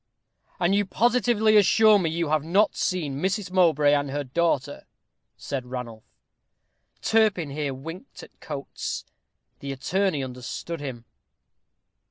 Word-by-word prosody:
"And 175 +2 +2
you 205 +1 +3
positively 225 -1 +3
assure 215 +1 +6
me 170 -4 0
you 165 -1 -2
have 155 -1 +1
not 195 +7 +2
seen 150 -7 -2
Mrs. 195 0 -1
Mowbray 160 -6 +4
and 145 -1 +1
her 145 +1 -2
daughter?" 145 0 -1 0.5
said 130 -3 -5
Ranulph. 125 -3 -7 0.9
Turpin 210 -9 +2
here 140 -2 -3
winked 165 - -10
at - - -16
Coates. 140 -2 -5 0.5
The 140 - -5
attorney 155 +3 -1
understood 130 +6 -6
him. 130 -5 -7
160 Hz, 125 wpm, -25 LUFS, 140-195 Hz, 0.9 s, assure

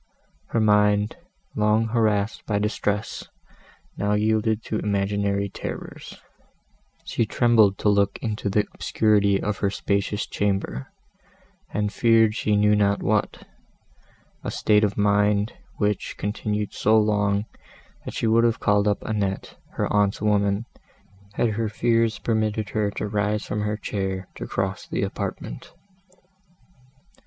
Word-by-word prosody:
Her 115 - 0
mind, 105 -1 +3 0.4
long 110 +1 +2
harassed 110 -2 0
by 105 - +1
distress, 105 0 -2 0.7
now 100 +1 0
yielded 110 +1 +1
to 110 - -2
imaginary 100 0 0
terrors; - - -8 0.9
she - - 0
trembled 110 -4 +4
to - - -1
look 100 -1 +2
into 105 -2 -3
the 105 +1 +2
obscurity 100 -2 +2
of 105 -1 -2
her 100 - +1
spacious 100 +1 -1
chamber, 100 -10 -2 0.8
and 105 -1 -2
feared 115 -2 +4
she 105 -1 0
knew 105 0 +4
not 100 -1 +1
what; 105 +1 -1 1.0
a - - -3
state 105 0 +2
of 100 -1 0
mind, 105 +1 +2 0.2
which 105 -2 -1
continued 105 0 -2
so 110 +1 +3
long, 105 -1 +2 0.6
that - - -7
she - - -1
would 115 +1 +4
have 115 -1 +2
called 105 0 +2
up 105 - 0
Annette, 100 -3 -2 0.2
her - - -1
aunt's 100 -1 +2
woman, 105 0 +1 0.7
had 115 - +1
her 110 0 -1
fears 115 +1 +1
permitted 110 -2 -1
her 105 -2 0
to 105 +1 -4
rise 105 0 -1
from 105 - -3
her 105 0 -1
chair, 95 -3 -3
and - - -38
to - - -6
cross 95 0 -3
the - - -2
apartment. - - -5
105 Hz, 135 wpm, -24 LUFS, 100-110 Hz, 1.0 s, trembled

